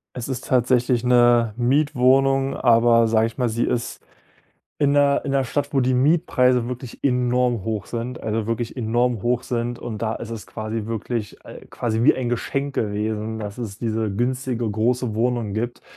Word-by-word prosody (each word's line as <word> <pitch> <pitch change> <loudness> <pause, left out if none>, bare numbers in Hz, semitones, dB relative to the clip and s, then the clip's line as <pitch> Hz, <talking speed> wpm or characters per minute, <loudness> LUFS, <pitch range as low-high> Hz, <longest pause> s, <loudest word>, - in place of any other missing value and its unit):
Es 125 - -5
ist 130 -1 -4
tatsächlich 125 -1 +2
'ne 120 -3 +4
Mietwohnung, 135 +1 +2
aber 115 -1 +4
sage 110 0 +3
ich 115 +2 -6
mal, 125 -2 +1
sie 115 +2 -1
ist 120 -1 -3 0.7
in 145 -1 +2
der 140 -1 +3
in 140 - -2
der 135 -1 +1
Stadt, 145 +3 -2
wo 140 - +1
die 130 0 +2
Mietpreise 125 -4 +2
wirklich 125 -1 -8
enorm 125 -3 +1
hoch 110 -2 -3
sind, 120 +1 -5
also 110 0 -2
wirklich 115 +1 -3
enorm 120 -1 0
hoch 120 +1 0
sind. 120 -1 -3
Und 110 -3 -6
da 110 0 -1
ist 115 - -8
es 115 -2 -7
quasi 110 -1 -4
wirklich, 115 -1 -4
äh, - - -11
quasi 115 -1 -2
wie - - +5
ein 130 -2 -2
Geschenk 140 +3 -2
gewesen, 110 +1 -2
dass 105 0 -7
es 110 -4 -6
diese 110 -2 -1
günstige 120 +1 -1
große 115 +2 0
Wohnung 115 -2 -1
gibt, 120 +3 -3
120 Hz, 175 wpm, -22 LUFS, 115-125 Hz, 0.7 s, wie